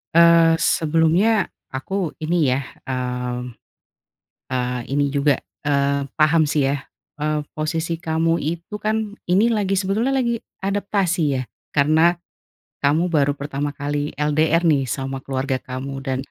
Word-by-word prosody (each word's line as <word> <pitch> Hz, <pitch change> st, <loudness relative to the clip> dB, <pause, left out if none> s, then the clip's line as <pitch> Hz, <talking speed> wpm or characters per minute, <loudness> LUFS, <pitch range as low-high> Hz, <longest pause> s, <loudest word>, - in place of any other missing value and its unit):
eee, 170 Hz, -1 st, +7 dB, 0.2 s
sebelumnya, 165 Hz, +6 st, +3 dB, 0.5 s
aku 135 Hz, +8 st, -5 dB, 0.3 s
ini 170 Hz, +3 st, 0 dB, 0.2 s
ya, 130 Hz, -, +2 dB, 0.3 s
mmm, 125 Hz, -1 st, -3 dB, 1.0 s
eee, 125 Hz, -1 st, -1 dB
ini 145 Hz, +1 st, +2 dB
juga, 140 Hz, -1 st, +3 dB, 0.2 s
eee, 140 Hz, -1 st, +1 dB, 0.2 s
paham 155 Hz, +1 st, +5 dB
sih 145 Hz, -3 st, +2 dB
ya, 140 Hz, +1 st, +1 dB, 0.4 s
eee, 155 Hz, 0 st, 0 dB, 0.2 s
posisi 160 Hz, +2 st, -2 dB
kamu 165 Hz, +1 st, +2 dB
itu 170 Hz, +6 st, -4 dB
kan, 215 Hz, +1 st, +2 dB, 0.3 s
ini 195 Hz, +5 st, +4 dB
lagi, 195 Hz, -1 st, 0 dB
sebetulnya 205 Hz, +7 st, 0 dB
lagi 235 Hz, -2 st, +1 dB, 0.3 s
adaptasi 200 Hz, -3 st, 0 dB, 0.2 s
ya. -, -, -1 dB, 0.3 s
Karena 155 Hz, +2 st, +4 dB, 0.8 s
kamu 155 Hz, +4 st, +3 dB
baru 145 Hz, -1 st, +3 dB
pertama 145 Hz, 0 st, -2 dB
kali 145 Hz, +1 st, -2 dB
LDR 155 Hz, +3 st, +2 dB
nih 140 Hz, -2 st, +2 dB
sama 135 Hz, 0 st, -4 dB
keluarga 135 Hz, 0 st, -1 dB
kamu, 130 Hz, +2 st, -5 dB
dan 130 Hz, -1 st, -1 dB
150 Hz, 130 wpm, -21 LUFS, 140-170 Hz, 1.0 s, eee